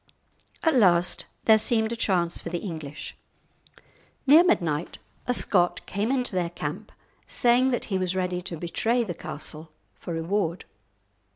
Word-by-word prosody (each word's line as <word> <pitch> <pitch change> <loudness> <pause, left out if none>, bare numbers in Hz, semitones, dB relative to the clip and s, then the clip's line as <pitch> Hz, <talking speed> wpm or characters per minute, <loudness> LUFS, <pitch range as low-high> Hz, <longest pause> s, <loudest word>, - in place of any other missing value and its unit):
At 320 - +3
last 175 -7 +3 0.2
there 220 -1 +6
seemed 220 0 +2
a - - -1
chance 180 -6 0
for - - -6
the 175 - -2
English. 160 -6 -7 1.1
Near 300 +5 +8
midnight 170 - 0 0.3
a 250 - +2
Scot 180 -5 +1
came 205 +5 -1
into 250 -5 0
their 175 -2 0
camp, 175 - -6 0.4
saying 245 +2 +3
that 245 - -1
he 190 - +1
was 185 0 -1
ready 180 -1 -1
to 175 -2 -6
betray 225 +9 0
the 190 -6 -4
castle 155 0 -8 0.3
for 170 - -6
a - - -2
reward. 170 +1 -1
185 Hz, 155 wpm, -26 LUFS, 170-230 Hz, 1.1 s, Near